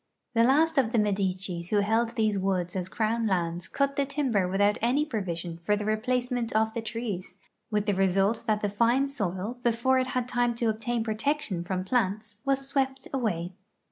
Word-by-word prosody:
The 230 -1 +4
last 305 +5 +4
of 235 -4 +1
the 240 - +1
IMedicis 190 -4 0
who 205 -1 +3
held 225 +3 +1
these 215 -2 +2
woods 185 -2 -1
as 185 -1 -2
crown 225 +2 0
lands 175 -2 -1
cut 280 0 0
the 280 - +2
timber 260 -10 +1
without 205 +3 +2
any 260 +6 +2
provision 175 - -4
for 210 +4 +2
the 210 0 -3
replacement 245 +2 0
of 220 0 +2
the 230 - -2
trees, 215 -5 -4 0.3
with 210 -2 0
the 205 - +2
result 195 +4 +2
that 215 -1 +1
the 205 - +1
fine 235 +6 +2
soil, 210 -1 -3
before 245 +2 +2
it 255 - 0
had 255 -1 -1
time 245 -1 +1
to 230 -1 0
obtain 225 +2 -1
protection 220 - -1
from 185 +1 -2
plants, 210 -1 -1
was 275 0 0
swept 270 -1 -1
away. 190 -9 -1
220 Hz, 185 wpm, -28 LUFS, 195-245 Hz, 0.3 s, The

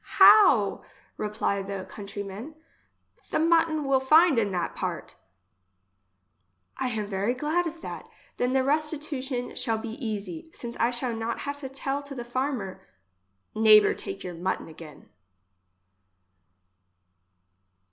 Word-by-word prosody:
How! 385 - +7 0.3
repply 210 -1 -1
the 195 -1 -5
country 200 +1 -7
man, 210 +11 -8 0.7
the - - 0
mutton 325 -1 +3
will 270 -1 +3
find 305 +1 +5
in 205 -3 0
that 175 -2 -2
part? - - -4 1.6
I - - -2
am 220 -3 -2
very 200 +4 -1
glad 315 +6 0
of 330 0 -8
that; - - -8 0.3
then 250 +1 0
the 265 -1 +3
restitution 285 -3 -2
shall 225 -2 0
be 225 +4 -7
easy, 205 - -5
since 235 0 -6
I 235 - +2
shall 245 0 -1
not 225 +1 -3
have 285 0 -4
to 275 -2 -7
tell 275 +1 -3
to 280 -1 -9
the 240 -2 -6
farm 260 +2 -1
er: 190 -1 -10 0.3
" 95 0 -47
Neighbour 215 -1 +6
take - - -7
your 180 - -6
mutton 180 +3 -3
again. 160 -1 -12
240 Hz, 135 wpm, -27 LUFS, 200-285 Hz, 1.6 s, How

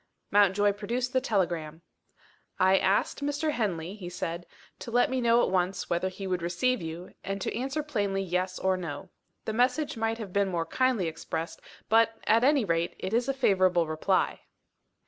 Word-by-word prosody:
Mountjoy 205 0 +4
produced 240 +5 -3
the 260 - +3
telegram. 170 - -1 0.8
"I 190 +1 +5
asked 195 +8 +1
Mr. 290 +2 0
Henley," 190 - -2
he 190 -4 -7
said, 170 0 -5 0.3
"to - - -7
let 245 +2 +2
me 260 -1 0
know 235 0 +4
at - - 0
once 185 0 -1
whether 175 +2 +1
he 195 +1 -8
would 180 -2 -1
receive 200 +9 0
you, 165 +2 -7
and 195 +1 -3
to - - -3
answer 270 +6 -2
plainly 205 -9 -1
Yes 185 0 -1
or 190 0 +1
No. 160 -5 -6 0.4
The 220 - -2
message 250 +4 +1
might 225 0 0
have 210 -5 -7
been 200 0 +2
more 170 -2 -1
kindly 245 -1 +1
expressed 160 +1 -5 0.3
but, 225 0 +3
at 225 +2 +4
any 275 -3 +4
rate, 165 -1 0
it 190 - -4
is 240 +3 +1
a - - +2
favourable 185 -8 +3
reply." 155 +5 0
195 Hz, 180 wpm, -28 LUFS, 180-235 Hz, 0.8 s, I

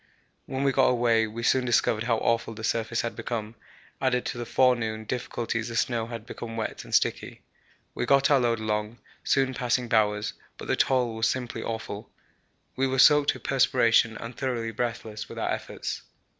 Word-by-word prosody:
When 135 +1 -2
we 140 - +3
got 135 0 +4
away 115 -2 +3
we 115 +2 -6
soon 130 +2 +3
discovered 115 -2 +1
how 115 -2 +2
awful 115 0 0
the 110 - -8
surface 115 +1 0
had 115 - -4
become; 110 -2 -4 0.5
added 125 -2 +1
to 120 - -4
the 120 - -5
forenoon 115 -4 +2
difficulties 115 -1 -3
the 115 - -6
snow 115 -1 0
had 115 -2 -7
become 115 -1 -7
wet 110 - -4
and - - -2
sticky. - - 0 0.5
We - - -3
got 140 +1 +4
our 140 - +6
load 120 -2 +1
along, 105 +1 -2 0.3
soon 135 -1 +2
passing 125 -1 0
Bowers, 105 -1 +2 0.2
but - - -8
the - - +2
toil 125 -3 +2
was 110 0 +1
simply 125 -2 -3
awful. 110 -2 -5 0.7
We 135 +1 +1
were 130 0 -1
soaked 145 +2 +6
with - - -12
perspiration 120 -4 +3
and 115 +1 -8
thoroughly 120 -4 -2
breathless 115 -2 -4
with - - -9
our - - -1
efforts. - - -4
115 Hz, 185 wpm, -27 LUFS, 110-125 Hz, 0.7 s, our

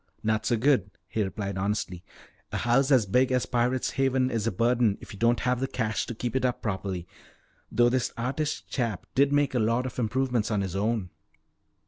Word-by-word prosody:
"Not 110 0 0
so 120 - +2
good," 125 -5 +2 0.2
he 110 +3 -2
replied 100 -1 -3
honestly. 95 -3 -2 0.5
"A - - -2
house 125 +4 +2
as 130 -6 +5
big 125 +7 +2
as 125 -1 +2
Pirate's 125 +1 0
Haven 130 -1 +1
is 115 -1 -1
a - - +2
burden 115 +1 +2
if - - -11
you 100 - -10
don't 115 +1 +3
have 125 0 +1
the 135 - -1
cash 110 -5 -2
to 120 - -5
keep 120 +2 -3
it 130 - +1
up 125 -1 +1
properly. 95 -4 -3 0.7
Though 120 0 +4
this 130 0 0
artist 140 +6 -2
chap 115 -8 -2
did 140 +1 +3
make 145 -1 +2
a 125 - +1
lot 115 +3 +1
of 125 - -5
improvements 125 -1 0
on 105 -3 +1
his 95 -2 -3
own." 105 -2 -1
120 Hz, 200 wpm, -27 LUFS, 105-130 Hz, 0.7 s, as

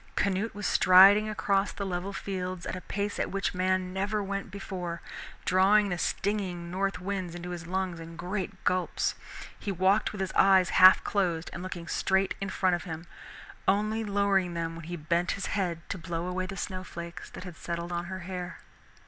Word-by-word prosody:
Canute 200 +2 0
was 205 -1 -5
striding 195 +4 +7
across 200 -1 +1
the 200 - -5
level 185 +1 -3
fields 185 -2 -4
at - - -3
a 185 - -6
pace 200 +2 -3
at - - 0
which 195 -1 -1
man 185 0 0
never 205 +2 -1
went 200 0 -4
before, 180 -3 -5 0.5
drawing 200 +3 +4
the 175 - -1
stinging 185 -4 -2
north 195 +1 -1
winds 185 -2 -3
into 175 +1 -6
his 170 -1 -6
lungs 185 -1 -2
in 165 0 -9
great 190 +3 -4
gulps. 185 -1 +1 0.5
He 200 - -3
walked 190 +3 +2
with 210 - -8
his 190 -1 -2
eyes 190 -2 +5
half 185 0 +8
closed 175 -5 0
and 175 - -6
looking 180 -2 -6
straight 190 +3 +1
in 195 - -2
front 185 -2 +2
of 175 - -6
him, 165 -1 -6 0.6
only 215 +3 +2
lowering 200 -3 +1
them 165 -1 -2
when 165 -1 -9
he 175 +2 -4
bent 170 +3 0
his 195 - -4
head 175 -4 -2
to 185 - -3
blow 170 0 -3
away 185 +1 -2
the 195 - -6
snow 185 0 -4
flakes 170 -2 -8
that 180 -2 -9
settled 170 +1 -4
on 175 0 -2
her 185 +1 -6
hair. 180 0 -5
185 Hz, 190 wpm, -29 LUFS, 175-195 Hz, 0.6 s, half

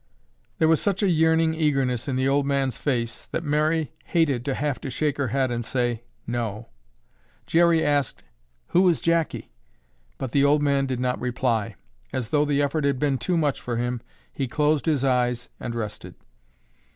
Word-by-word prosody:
There 160 - +3
was 160 -1 +3
such 200 0 0
a 200 - +3
yearning 160 0 +3
eagerness 135 -6 0
in 135 - -1
the 130 +1 +1
old 140 0 +2
man's 135 -3 0
face 120 -5 -2
that 165 - -3
Mary 155 +1 +1
hated 145 -8 +1
to 135 -2 -1
have 145 -2 -2
to 135 - -5
shake 145 +2 -1
her 140 -2 0
head 130 +1 0
and 120 0 -2
say, 120 -2 -1 0.2
"No." 115 -2 -3 0.8
Jerry 170 -1 +3
asked, 145 -4 0 0.5
"Who 180 +1 +4
is 170 - +1
Jackie?" 165 -1 0 0.7
But 130 - -4
the 140 +2 +3
old 145 +1 +4
man 140 -1 +2
did 130 -2 -2
not 125 0 -1
reply. 120 -3 -1 0.4
As 120 -4 -3
though 150 +1 +2
the 145 -1 +1
effort 145 +2 0
had 140 -2 +1
been 135 -1 0
too 175 +9 0
much 150 -4 0
for 120 -2 -3
him, 120 0 -2 0.3
he 135 - -2
closed 150 +4 +1
his 145 -4 +2
eyes 125 -2 +1
and 120 -1 -5
rested. 105 -2 -6
140 Hz, 180 wpm, -24 LUFS, 125-155 Hz, 0.8 s, Who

